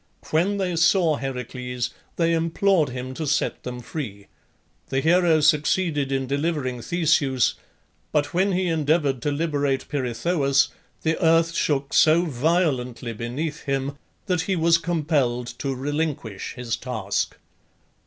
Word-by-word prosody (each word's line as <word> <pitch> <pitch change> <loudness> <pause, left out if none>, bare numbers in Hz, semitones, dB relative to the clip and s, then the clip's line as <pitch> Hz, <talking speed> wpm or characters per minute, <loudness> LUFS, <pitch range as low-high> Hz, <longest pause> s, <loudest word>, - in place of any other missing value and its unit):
When 180 +6 +2
they 185 -3 -1
saw 165 -2 +4
Heracles 125 -2 -4 0.2
they 165 -1 +2
implored 165 0 +2
him 125 +1 -5
to 155 +3 -4
set 150 - 0
them 125 -1 -6
free. 110 -7 -6 0.6
The 135 - +1
hero 165 +1 +4
succeeded 150 -1 +2
in 135 -1 0
delivering 140 -3 -1
Theseus, 150 -4 +2 0.6
but 145 +1 0
when 190 +3 +2
he 185 +1 +1
endeavoured 150 -5 +1
to 145 - 0
liberate 145 -3 -1
Pirithoeus, 140 +1 +1 0.3
the 160 +1 0
earth 165 0 +4
shook 140 -4 0
so 160 +2 +5
violently 130 -5 0
beneath 140 +8 -4
him 140 0 -1 0.3
that 180 -4 +1
he 190 +3 -1
was 165 0 +4
compelled 150 -7 0
to 135 -1 -2
relinquish 140 -6 -3
his 120 -2 -2
task. 110 -6 -2
145 Hz, 130 wpm, -24 LUFS, 130-165 Hz, 0.6 s, so